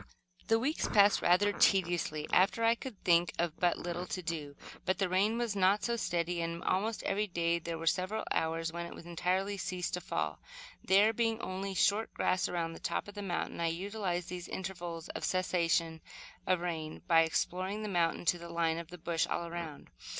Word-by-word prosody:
The 225 - +4
weeks 275 +7 0
passed, 205 -1 +5
rather 190 +4 +4
tediously 175 -7 +2
after 195 +5 +4
I 230 0 +5
could 235 -3 -8
think 170 -1 +4
of 170 -1 -1
but 175 -1 +2
little 175 +1 -4
to 185 0 -4
do, 155 -4 -4 0.3
but 185 0 0
the 195 - +1
rain 200 +5 +2
was 235 -3 -1
not 195 +2 +3
so 235 - +1
steady 175 -5 -1
and, 170 0 -3
almost 210 +4 0
every 210 +2 0
day, 170 -2 0
there 170 0 -4
were 165 - -6
several 185 +6 0
hours 165 0 0
when 170 0 -4
it 170 - -10
entirely 185 +4 -1
ceased 180 -1 -3
to 180 - -1
fall. - - -2 0.4
There 205 +4 +5
being 225 0 0
only 190 +1 -4
short 205 +4 +2
grass 185 0 +1
around 170 -2 -2
the - - -10
top - - -2
of 205 - -9
the 205 - -6
mountain, 180 -4 -3
I 170 - +1
utilized 180 0 -2
these 180 -1 -6
intervals 175 -3 -5
of - - -5
the - - -1
cessation 170 -3 +1 0.5
of 185 -2 +2
rain 160 -3 -4
by 165 -3 +6
exploring 185 +5 -1
the - - -3
mountain 175 -3 0
to 175 +1 +2
the 170 0 -9
line 165 -1 0
of 170 - -7
the 180 - -9
bush, 165 0 0
all 170 - -2
around. 170 -3 -7
180 Hz, 200 wpm, -32 LUFS, 170-195 Hz, 0.5 s, by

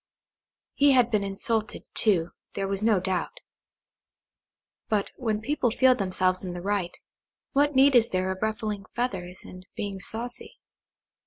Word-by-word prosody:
He 285 -1 +5
had 245 -2 +4
been 210 -2 +2
insulted, 215 +3 -2
too, 175 -6 +2 0.2
there 195 -1 -1
was 195 0 -2
no 215 -3 +3
doubt; 190 - -2 1.5
but 210 -2 0
when 220 -4 -2
people 260 0 0
feel 255 +3 +5
themselves 185 -4 0
in 180 -2 -4
the 175 - -6
right, 195 -3 -2 0.5
what 290 0 +2
need 270 +1 +6
is 230 -2 +5
there 185 0 0
of 190 - -6
ruffling 215 -2 -2
feathers 190 -7 -3
and 185 0 -11
being 200 -2 -4
saucy? 235 +5 -5
210 Hz, 145 wpm, -27 LUFS, 190-240 Hz, 1.5 s, need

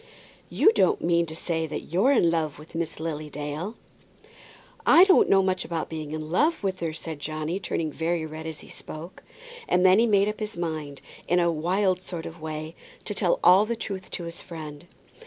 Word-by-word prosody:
"You 430 - +5
don't 420 -4 +2
mean 170 -1 +2
to 160 - -7
say 160 -1 -2
that 155 - -7
you're 200 +10 +4
in 175 -11 +4
love 160 -3 -1
with 155 +3 -14
Miss 165 -2 -3
Lily 155 -2 -4
Dale?" 150 +9 -5 1.1
"I 345 - +8
don't 385 -1 +5
know 195 -1 +5
much 185 -1 0
about 165 -2 -3
being 155 -2 -5
in 155 0 -5
love 305 - +2
with 190 -1 -1
her," 165 -2 -2
said 155 -1 -7
Johnny, 155 +4 -3
turning 165 -4 -2
very 165 +1 -1
red 160 +1 -7
as 160 -2 -6
he - - -13
spoke. 160 +4 -9 0.5
And 180 +1 +3
then 185 +2 +7
he 235 - +4
made 200 -2 +4
up 210 - -3
his 215 -4 -5
mind, 155 -4 -4 0.3
in 180 - +3
a 170 -1 +3
wild 185 +4 +1
sort 175 -3 -6
of 165 0 -9
way, 155 0 -5 0.3
to - - -3
tell - - +1
all 195 +4 +7
the 235 - -1
truth 195 -4 -6
to 175 - -5
his 170 0 -6
friend. 155 -1 -9
170 Hz, 205 wpm, -26 LUFS, 155-190 Hz, 1.1 s, I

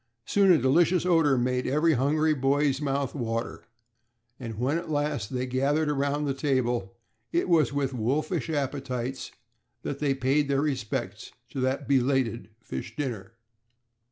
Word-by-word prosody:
Soon 200 -2 +4
a 170 - +6
delicious 170 +7 +3
odor 165 -6 +4
made 125 +1 0
every 150 +5 +3
hungry 155 +4 +2
boy's 140 0 +1
mouth 140 -2 -1
water, 115 -3 -3 0.7
and 115 -4 -6
when 135 +8 0
at 170 -1 -9
last 145 -8 -1
they 125 0 -1
gathered 140 +4 +1
around 145 +1 0
the 140 - 0
table 125 -7 -1 0.4
it 345 +1 +1
was 155 -8 +3
with 140 -2 -1
wolfish 140 - -1
appetites 135 -3 -3 0.5
that 140 - -4
they 140 -2 +1
paid 135 +3 +1
their 140 0 +1
respects 110 -8 -3 0.2
to 135 - -6
that 130 +2 -1
belated 130 -4 +1
fish 115 +1 -7
dinner. 115 -7 -4
135 Hz, 145 wpm, -27 LUFS, 125-150 Hz, 0.7 s, a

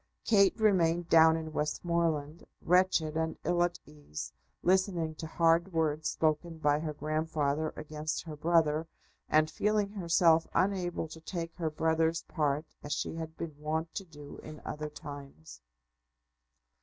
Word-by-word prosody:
Kate 200 -1 +4
remained 175 -5 +3
down 160 0 +7
in 160 -1 -6
Westmoreland, 155 0 -1 0.2
wretched 180 -3 +3
and 160 0 -1
ill 175 0 +1
at 175 0 +1
ease, 145 - -8 0.3
listening 180 -3 +2
to 160 +1 -7
hard 165 +3 +2
words 155 -1 0
spoken 160 +1 0
by 150 -1 +2
her 155 0 -3
grandfather 155 0 -1
against 155 0 -4
her 155 -3 -7
brother, 160 0 +2 0.4
and 155 0 +3
feeling 210 -1 +1
herself 170 -4 +3
unable 185 -4 0
to 160 +1 -11
take 165 0 -5
her 165 -3 -2
brother's 160 +1 +1
part 150 -1 -1 0.2
as 145 - -3
she - - -2
had 160 0 -6
been 160 -3 -5
wont 160 +2 -2
to 200 - -4
do 150 -5 -12
in 155 -1 -10
other 150 0 -4
times. 140 - -10
160 Hz, 145 wpm, -31 LUFS, 150-170 Hz, 0.4 s, down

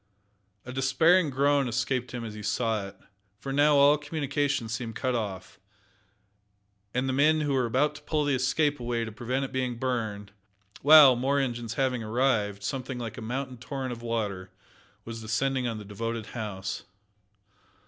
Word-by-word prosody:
A 125 - -7
despairing 150 +6 +3
groan 140 0 +2
escaped 125 +1 -1
him 120 -2 -5
as 110 - -6
he 105 - -8
saw 110 -1 -1
it, 100 - -12 0.4
for 135 +5 -5
now 145 +1 +4
all 140 +1 +6
communication 145 -4 -1
seemed 115 0 -4
cut 130 +1 -1
off, 105 -6 -4 1.3
and 125 +3 -1
the 130 - 0
men 150 +2 +3
were 130 -4 +1
about 140 +6 +1
to 150 - -12
pull 150 0 -1
the 145 - +1
Escape 145 +3 +1
away 120 -1 -2
to 110 - -7
prevent 125 +5 -2
its - - -8
being 130 -2 -1
burned, 110 -5 -3 0.5
while, 145 -3 +9
more 135 +4 0
engines 120 -4 -3
having 130 -3 0
arrived, 110 -3 0
something 130 +2 -4
like 115 0 -6
a - - -8
mountain 125 +3 -4
torrent 130 0 -4
of 120 -1 -7
water 105 -6 -3 0.6
was 115 0 -7
descending 125 +4 0
on 115 -2 -3
the 105 - -8
devoted 115 +2 -4
house. 100 -5 -4
125 Hz, 165 wpm, -28 LUFS, 115-135 Hz, 1.3 s, while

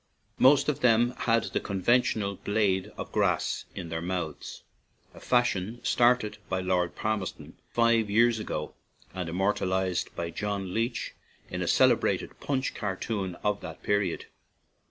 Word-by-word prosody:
Most 140 +2 +6
of 150 - 0
them 120 0 +4
had 115 -1 +2
the - - -2
con 100 -2 -4
ventional 105 -2 +1
blade 100 -3 +1
of - - -6
grass - - 0
in 85 - -6
their 80 0 -3
mouths, 85 -3 -4 0.5
a - - -13
fashion 120 -3 +1
started 120 -3 +2
by 95 - 0
Lord 90 -2 0
Palmerston 110 -3 -4
fifty 115 -3 +2
years 115 +1 +4
ago 75 -7 -4 0.4
and 90 -3 -4
immortalized 95 0 0
by 85 0 -3
John 100 0 -3
Leech 115 +2 -2 0.4
in - - -3
a - - -1
celebrated - - +2
Punch 135 -2 -1
cartoon 95 -2 -3
of 105 -1 0
the 80 -2 -6
period. 100 0 -1
100 Hz, 140 wpm, -28 LUFS, 95-115 Hz, 0.5 s, Most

